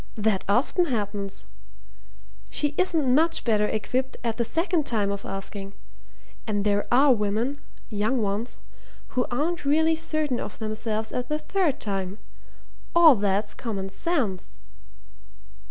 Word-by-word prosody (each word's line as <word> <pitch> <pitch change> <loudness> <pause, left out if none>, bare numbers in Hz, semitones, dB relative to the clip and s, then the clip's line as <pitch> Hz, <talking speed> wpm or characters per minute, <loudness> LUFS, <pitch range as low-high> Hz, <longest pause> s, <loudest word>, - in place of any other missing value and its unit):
That 210 -3 +1
often 255 - +3
happens. 205 - -3 1.0
She 295 0 0
isn't 320 -8 +2
much 325 +4 +3
better 210 -3 +2
equipped 255 +5 -2
at 230 -2 -1
the 235 - +2
second 330 - 0
time 205 -4 +1
of 200 0 -5
asking. 195 0 -5 0.7
And 205 -2 0
there 205 0 +1
are 265 +2 +6
women 225 +6 -1 0.3
young 215 +5 +1
ones 210 +3 -2 0.5
who 250 -1 0
aren't 320 +8 -1
really 320 +3 +3
certain 310 -5 -1
of - - -6
themselves 220 0 -2
at 250 0 -3
the 300 - +1
third 310 -4 0
time. 195 -3 -3 0.8
All 335 -3 +9
that's 205 -1 0
common 195 -5 -4
sense." 220 - -2
230 Hz, 130 wpm, -26 LUFS, 205-295 Hz, 1.0 s, All